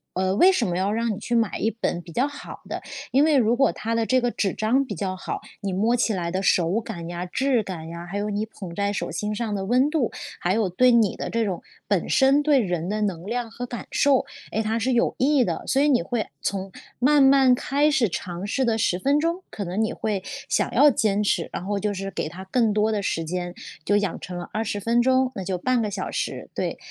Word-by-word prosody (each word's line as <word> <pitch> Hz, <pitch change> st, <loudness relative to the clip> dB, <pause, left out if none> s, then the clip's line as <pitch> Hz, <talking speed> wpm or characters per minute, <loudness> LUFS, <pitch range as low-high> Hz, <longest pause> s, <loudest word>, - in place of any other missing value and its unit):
呃， 185 Hz, 0 st, +1 dB
为 370 Hz, -, +7 dB
什 265 Hz, -11 st, +1 dB
么 175 Hz, 0 st, -1 dB
要 195 Hz, +2 st, 0 dB
让 230 Hz, 0 st, 0 dB
你 195 Hz, -, -6 dB
去 235 Hz, +2 st, -2 dB
买 225 Hz, -3 st, +1 dB
一 220 Hz, -, +1 dB
本 200 Hz, -6 st, -2 dB
比 175 Hz, -, -12 dB
较 255 Hz, -, +2 dB
好 290 Hz, 0 st, -9 dB
的， -, -, -4 dB, 0.3 s
因 275 Hz, +3 st, +4 dB
为 310 Hz, -2 st, +3 dB
如 235 Hz, -2 st, +3 dB
果 270 Hz, -, +4 dB
它 225 Hz, +1 st, -3 dB
的 230 Hz, -, +1 dB
这 255 Hz, +3 st, +3 dB
个 245 Hz, -, +1 dB
纸 195 Hz, -, -1 dB
张 250 Hz, +6 st, +1 dB
比 215 Hz, -, -5 dB
较 185 Hz, +2 st, -3 dB
好， -, -, -5 dB, 0.2 s
你 195 Hz, -2 st, -2 dB
摸 220 Hz, +5 st, +2 dB
起 235 Hz, -2 st, +1 dB
来 170 Hz, -2 st, -2 dB
的 190 Hz, +1 st, -1 dB
手 180 Hz, +2 st, +2 dB
感 175 Hz, -7 st, -7 dB
呀、 175 Hz, +1 st, -4 dB
质 250 Hz, +4 st, +1 dB
感 165 Hz, -4 st, -7 dB
呀， 170 Hz, +1 st, -7 dB
还 200 Hz, -, -3 dB
有 210 Hz, +1 st, -2 dB
你 210 Hz, +1 st, -1 dB
捧 190 Hz, -5 st, -9 dB
在 200 Hz, +1 st, 0 dB
手 -, -, -3 dB
心 210 Hz, 0 st, -3 dB
上 220 Hz, -2 st, -2 dB
的 195 Hz, -1 st, -3 dB
温 250 Hz, +7 st, +3 dB
度， 300 Hz, -7 st, 0 dB, 0.3 s
还 180 Hz, +2 st, +1 dB
有 215 Hz, -3 st, +1 dB
对 250 Hz, +8 st, +4 dB
你 225 Hz, -4 st, +3 dB
的 -, -, -4 dB
这 230 Hz, 0 st, 0 dB
种 190 Hz, -5 st, -2 dB, 0.3 s
本 -, -, +1 dB
身 275 Hz, +2 st, +4 dB
对 290 Hz, -3 st, +4 dB
人 175 Hz, -5 st, -2 dB
的 210 Hz, +2 st, -2 dB
能 185 Hz, -5 st, -2 dB
量 235 Hz, +1 st, -3 dB
和 245 Hz, +2 st, -5 dB
感 240 Hz, -1 st, -7 dB
受， 280 Hz, -2 st, +3 dB, 0.3 s
哎， 220 Hz, -, 0 dB
它 220 Hz, +1 st, -1 dB
是 255 Hz, +3 st, +1 dB
有 240 Hz, -, +2 dB
益 275 Hz, 0 st, +3 dB
的。 170 Hz, -7 st, -2 dB
所 270 Hz, -, +2 dB
以 295 Hz, -, +4 dB
你 255 Hz, -4 st, +4 dB
会 240 Hz, -3 st, -2 dB
从 195 Hz, -1 st, -3 dB, 0.3 s
慢 285 Hz, +4 st, +4 dB
慢 270 Hz, -1 st, +6 dB
开 285 Hz, +4 st, +2 dB
始 260 Hz, -6 st, +3 dB
尝 180 Hz, +1 st, -5 dB
试 260 Hz, +5 st, 0 dB
的 230 Hz, -2 st, +1 dB
10 180 Hz, -4 st, +1 dB
分 280 Hz, +10 st, +2 dB
钟， 335 Hz, +4 st, -1 dB
可 200 Hz, -, -5 dB
能 185 Hz, +5 st, -1 dB
你 220 Hz, -, -1 dB
会 200 Hz, -3 st, -2 dB, 0.2 s
想 -, -, 0 dB
要 295 Hz, -, +7 dB
坚 210 Hz, -5 st, +1 dB
持， 175 Hz, -4 st, 0 dB
然 180 Hz, -, -5 dB
后 205 Hz, +1 st, -1 dB
就 205 Hz, +1 st, -1 dB
是 195 Hz, 0 st, -4 dB
给 155 Hz, -, -3 dB
它 185 Hz, +3 st, -9 dB
更 225 Hz, +2 st, +2 dB
多 210 Hz, +1 st, +2 dB
的 215 Hz, -2 st, 0 dB
时 165 Hz, -3 st, -1 dB
间， 175 Hz, +1 st, -3 dB, 0.3 s
就 205 Hz, +5 st, +2 dB
养 200 Hz, -4 st, -1 dB
成 180 Hz, -1 st, -6 dB
了 175 Hz, -, -7 dB
20 215 Hz, -1 st, -2 dB
分 230 Hz, +4 st, +2 dB
钟， 260 Hz, +1 st, +2 dB
那 195 Hz, -, -4 dB
就 185 Hz, 0 st, -2 dB
半 250 Hz, +6 st, +1 dB
个 210 Hz, -2 st, -2 dB
小 190 Hz, -1 st, -3 dB
时， -, -, -4 dB
对。 -, -, -2 dB
215 Hz, 265 characters per minute, -24 LUFS, 190-250 Hz, 0.3 s, 为